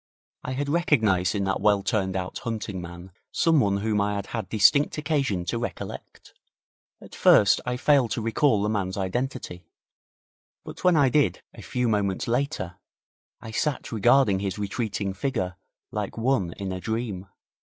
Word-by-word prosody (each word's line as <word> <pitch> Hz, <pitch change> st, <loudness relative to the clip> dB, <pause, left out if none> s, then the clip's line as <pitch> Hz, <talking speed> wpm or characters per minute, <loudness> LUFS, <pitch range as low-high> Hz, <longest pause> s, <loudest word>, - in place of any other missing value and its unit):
I 130 Hz, -, -4 dB
had 140 Hz, +2 st, -2 dB
recognized 110 Hz, -, +2 dB
in 100 Hz, -, 0 dB
that 95 Hz, 0 st, -1 dB
well 100 Hz, -1 st, +3 dB
turned 95 Hz, -5 st, 0 dB
out 90 Hz, -1 st, -3 dB
hunting 110 Hz, -5 st, -4 dB
man 85 Hz, +1 st, -10 dB, 0.2 s
someone 130 Hz, -12 st, +3 dB
whom 105 Hz, -1 st, +1 dB
I 105 Hz, 0 st, 0 dB
had 100 Hz, -1 st, -3 dB
had 95 Hz, -, -5 dB
distinct 140 Hz, +9 st, +4 dB
occasion 140 Hz, -, -1 dB
to 115 Hz, -, -2 dB
recollect. 120 Hz, -, -7 dB, 0.7 s
At -, -, -14 dB
first 100 Hz, -2 st, +5 dB
I 125 Hz, 0 st, -1 dB
failed 135 Hz, -3 st, +3 dB
to -, -, -1 dB
recall 115 Hz, -1 st, +2 dB
the -, -, +1 dB
man's 95 Hz, -3 st, -2 dB
identity, 95 Hz, -4 st, -3 dB, 1.0 s
but -, -, -9 dB
when 180 Hz, -1 st, +5 dB
I 140 Hz, -4 st, +4 dB
did, 145 Hz, +3 st, +1 dB
a -, -, -11 dB
few 125 Hz, -2 st, -1 dB
moments 100 Hz, -3 st, 0 dB
later, 120 Hz, -, -2 dB, 0.6 s
I 110 Hz, -, -8 dB
sat 140 Hz, +5 st, -2 dB
regarding 115 Hz, -2 st, +4 dB
his 95 Hz, -1 st, -3 dB
retreating 100 Hz, -1 st, -3 dB
figure 95 Hz, -5 st, -2 dB, 0.4 s
like 105 Hz, -1 st, -4 dB
one 115 Hz, -8 st, 0 dB
in 100 Hz, -1 st, -5 dB
a 95 Hz, -, -4 dB
dream. 110 Hz, -4 st, -3 dB
105 Hz, 160 wpm, -25 LUFS, 95-130 Hz, 1.0 s, first